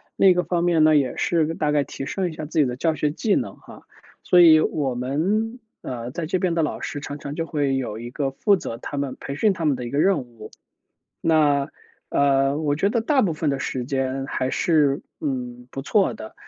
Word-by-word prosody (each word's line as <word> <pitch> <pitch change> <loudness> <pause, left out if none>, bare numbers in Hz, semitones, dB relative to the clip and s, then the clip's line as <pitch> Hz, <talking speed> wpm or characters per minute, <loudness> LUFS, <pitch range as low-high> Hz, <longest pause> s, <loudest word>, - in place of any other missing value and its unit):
另 195 - +5
一 - - +7
个 180 - +1
方 175 -1 -1
面 170 -3 +3
呢， 155 0 +5
也 140 -3 +1
是 165 -1 +1
大 150 -2 0
概 145 -1 +2
提 135 0 -7
升 185 +4 -2
一 - - -8
下 155 - -5
自 155 +2 -2
己 150 - +5
的 125 -1 -3
教 160 +5 0
学 150 -1 0
技 200 +8 0
能 - - -2
哈。 - - -14 0.4
所 180 - +5
以 160 -2 +8
我 145 -4 0
们， 190 - -1 0.2
呃， 120 -1 -5
在 165 +4 -4
这 180 +4 -1
边 180 -1 0
的 165 - +1
老 150 - -2
师 145 - -4
常 145 0 -6
常 140 +1 -6
就 165 - -2
会 145 -4 0
有 115 -5 -4
一 120 +1 -7
个 140 +1 -1
负 200 +9 +2
责 115 - -6
他 145 +4 -7
们 140 -2 -2
培 140 - -6
训 210 +6 +2
他 170 -3 -5
们 145 -4 +2
的 125 - -5
一 - - -5
个 140 - -3
任 195 +4 +3
务。 115 -3 -13 0.7
那， 150 -3 +2 0.4
呃， 140 0 +2
我 145 -2 0
觉 190 - +2
得 230 +1 0
大 270 +4 +2
部 180 -8 +1
分 155 0 -1
的 140 -1 -1
时 130 - -3
间 135 0 -2
还 130 -2 -2
是， 145 -3 +2 0.2
嗯， 125 -3 -4
不 135 - -6
错 190 - +2
的。 110 0 -9
145 Hz, 255 characters per minute, -23 LUFS, 135-170 Hz, 0.7 s, 以